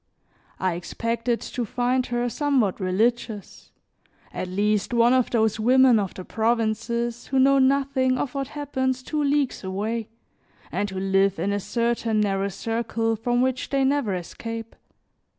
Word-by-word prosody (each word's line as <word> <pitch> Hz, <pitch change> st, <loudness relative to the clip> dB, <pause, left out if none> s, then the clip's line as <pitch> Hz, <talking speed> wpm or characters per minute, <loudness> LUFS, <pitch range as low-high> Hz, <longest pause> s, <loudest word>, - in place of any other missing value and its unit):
I 185 Hz, -2 st, 0 dB
expected 230 Hz, +7 st, -2 dB
to 245 Hz, -, -4 dB
find 245 Hz, +3 st, 0 dB
her 240 Hz, 0 st, -1 dB
somewhat 255 Hz, -7 st, +1 dB
religious, 210 Hz, +2 st, -1 dB, 0.6 s
at -, -, -3 dB
least 210 Hz, +4 st, 0 dB
one 235 Hz, +1 st, +5 dB
of 255 Hz, -2 st, +2 dB
those 220 Hz, -2 st, +1 dB
women 250 Hz, +1 st, +5 dB
of 195 Hz, -3 st, -3 dB
the 185 Hz, -, -8 dB
provinces 230 Hz, +1 st, -1 dB
who 270 Hz, -, -1 dB
know 275 Hz, +1 st, +5 dB
nothing 265 Hz, -1 st, +2 dB
of 255 Hz, 0 st, -3 dB
what 275 Hz, -1 st, -2 dB
happens 260 Hz, -3 st, -1 dB
two 300 Hz, +2 st, -1 dB
leagues 285 Hz, -4 st, 0 dB
away, 210 Hz, +4 st, -3 dB, 0.6 s
and 205 Hz, 0 st, -1 dB
who 190 Hz, -1 st, -5 dB
live 195 Hz, 0 st, +2 dB
in 195 Hz, +5 st, -1 dB
a 205 Hz, -, 0 dB
certain 230 Hz, +1 st, 0 dB
narrow 200 Hz, -1 st, +1 dB
circle 225 Hz, +2 st, -1 dB
from 240 Hz, +3 st, +1 dB
which 260 Hz, 0 st, -1 dB
they 275 Hz, -1 st, +1 dB
never 265 Hz, -7 st, +1 dB
escape. 225 Hz, +6 st, -6 dB
230 Hz, 150 wpm, -24 LUFS, 205-255 Hz, 0.6 s, one